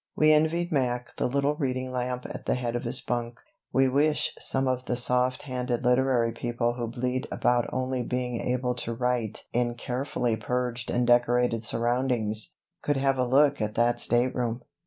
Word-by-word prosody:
We 155 0 +5
envied 160 +3 +1
Mac 125 -4 -1
the - - +1
little 140 +3 +1
reading 130 -3 -2
lamp 125 0 -3
at - - -8
the - - +2
head 120 -1 -2
of 120 - -3
his 125 +2 +3
bunk. 120 -1 -3 0.3
We 135 0 +3
wish 150 +3 +2
some 135 0 +1
of 130 0 -1
the 125 - -1
soft 125 +1 +1
handed 125 -3 -2
literary 125 -1 +2
people 120 +1 -1
who 120 -1 -4
bleat 125 +2 -2
about 120 -1 +1
only 130 0 -1
being 125 0 -2
able 125 0 0
to 115 -1 -3
write 125 -3 -1
in 120 0 0
carefully 125 -1 -2
purged 125 +1 -2
and 120 0 +1
decorated 120 -1 +3
surroundings 115 -2 0 0.3
could 145 -1 0
have 135 -1 +1
a 125 - +2
look 140 +1 +4
at 105 0 -2
that 120 +1 +2
stateroom. 120 -1 +1
125 Hz, 175 wpm, -27 LUFS, 120-130 Hz, 0.3 s, We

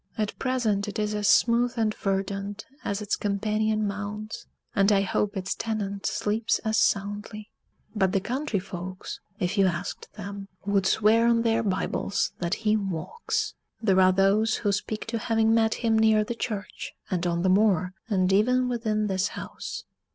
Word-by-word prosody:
At 215 -1 -2
present 230 -6 0
it 205 - -5
is 210 0 0
as 210 -1 0
smooth 240 +3 +4
and 220 -2 +1
verdant 195 +1 -2 0.2
as 200 +1 -2
its 205 - 0
companion 215 +1 0
mounds 210 +1 -5 0.3
and 195 +1 +4
I 200 -1 +4
hope 200 +1 -1
its 190 0 -2
tenant 200 -3 -3
sleeps 220 +2 0
as 220 0 +1
soundly. 205 +1 -1 0.4
But 190 -3 +2
the 195 - +2
country 245 +3 -2
folks, 185 -1 -6 0.2
if 185 +1 0
you 195 - +6
asked 175 0 -4
them, 200 -1 -7 0.2
would 200 -1 +2
swear 220 +3 +4
on 230 -1 +3
their 225 -1 +2
Bibles 200 -1 -1
that 175 +2 0
he 215 0 +4
walks. 195 - -2 0.3
There 190 -4 +3
are 185 0 +6
those 200 +4 +3
who 205 - +4
speak 215 +2 -3
to 225 0 -3
having 225 0 +2
met 225 -1 +3
him 225 -2 +2
near 220 -1 +4
the 235 +3 -3
church, 215 -4 -5 0.2
and 180 -1 0
on 170 0 0
the 190 - +3
moor, 185 -2 +3 0.2
and 190 -2 +2
even 250 +5 +3
within 220 -3 0
this 190 -1 +1
house. - - -7
210 Hz, 170 wpm, -26 LUFS, 195-220 Hz, 0.4 s, you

